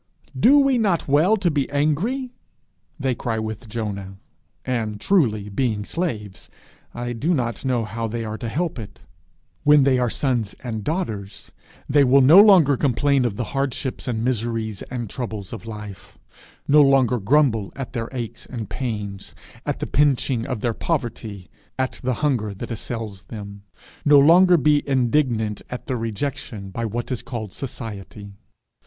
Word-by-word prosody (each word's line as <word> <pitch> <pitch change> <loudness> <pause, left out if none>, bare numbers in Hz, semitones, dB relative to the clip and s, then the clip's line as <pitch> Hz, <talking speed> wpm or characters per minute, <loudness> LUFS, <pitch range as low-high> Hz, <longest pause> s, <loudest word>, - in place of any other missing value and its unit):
'Do 250 - +6
we 275 -3 +4
not 195 -7 +1
well 155 +10 +4
to 185 -4 +1
be 145 -2 0
angry?' 185 - 0 0.7
they 135 -2 0
cry 115 -1 -3
with 110 +1 -5
Jonah; 100 -4 -5 0.5
and, 110 -5 -2
truly, 110 - +2
being 105 -1 -1
slaves, 105 - -4 0.5
I 120 0 -3
do 155 +9 0
not 120 -5 -2
know 125 -4 0
how 115 +2 -4
they 115 +1 -4
are 110 0 -5
to 115 - -4
help 160 +2 -2
it. 105 - -9 0.6
When 150 -1 +6
they 130 -2 +3
are 125 -1 +1
sons 120 -5 -1
and 110 -4 -4
daughters, 110 - -4 0.4
they 145 +1 +4
will 135 +1 +5
no 155 +9 +9
longer 175 -10 +6
complain 140 0 +2
of 110 -4 -1
the 120 - -2
hardships, 135 -2 -2
and 115 -2 -1
miseries, 115 -4 -2
and 120 -2 -4
troubles 110 -4 -6
of 115 0 -8
life; 105 -3 -9 0.5
no 150 +1 +6
longer 135 -4 +4
grumble 115 -2 +2
at 135 -2 -6
their 115 -2 -3
aches 120 -3 -6
and 115 -5 -6
pains, 105 -6 -5 0.3
at - - -1
the - - -3
pinching 135 -4 +1
of 125 -6 -3
their 120 -2 0
poverty, 110 - -3 0.3
at 130 0 -2
the 130 -1 -1
hunger 110 -8 0
that 100 - -7
assails 110 -4 -6
them; 100 -2 -9 0.4
no 145 -1 +6
longer 175 +5 +7
be 145 0 +3
indignant 120 -5 +1
at 125 - -6
their 130 - -2
rejection 115 -3 -4
by 115 +4 -3
what 120 +4 -4
is 125 - -2
called 110 -6 -6
Society. 105 -5 -7
120 Hz, 160 wpm, -22 LUFS, 110-140 Hz, 0.7 s, no